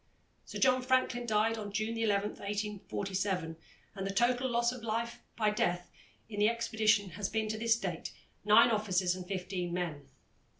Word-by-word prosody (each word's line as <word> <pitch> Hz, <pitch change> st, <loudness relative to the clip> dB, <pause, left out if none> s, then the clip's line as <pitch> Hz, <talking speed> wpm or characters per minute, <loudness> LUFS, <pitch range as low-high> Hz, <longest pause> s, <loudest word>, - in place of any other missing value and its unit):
Sir -, -, -7 dB
John 255 Hz, -1 st, +4 dB
Franklin 255 Hz, -1 st, +1 dB
died 220 Hz, +1 st, +2 dB
on 205 Hz, -1 st, -5 dB
June 215 Hz, +3 st, -1 dB
11, 210 Hz, -2 st, +1 dB
1847, 200 Hz, -4 st, -3 dB, 0.4 s
and 195 Hz, -2 st, -4 dB
the -, -, -2 dB
total 245 Hz, +5 st, +2 dB
loss 235 Hz, 0 st, +2 dB
of 250 Hz, -1 st, -8 dB
life 230 Hz, +1 st, -2 dB, 0.2 s
by 215 Hz, -2 st, +2 dB
death 175 Hz, -4 st, -1 dB, 0.4 s
in 210 Hz, -2 st, -6 dB
the 210 Hz, +1 st, +5 dB
expedition 220 Hz, -4 st, +1 dB
has 200 Hz, +2 st, -3 dB
been 220 Hz, 0 st, -1 dB
to 215 Hz, -, -2 dB
this 230 Hz, 0 st, +3 dB
date 180 Hz, -6 st, -4 dB, 0.3 s
nine 215 Hz, +3 st, +6 dB
officers 190 Hz, -4 st, +1 dB
and 180 Hz, -1 st, -8 dB
fifteen 180 Hz, -2 st, -3 dB
men. 165 Hz, -5 st, -4 dB
210 Hz, 165 wpm, -32 LUFS, 190-230 Hz, 0.4 s, nine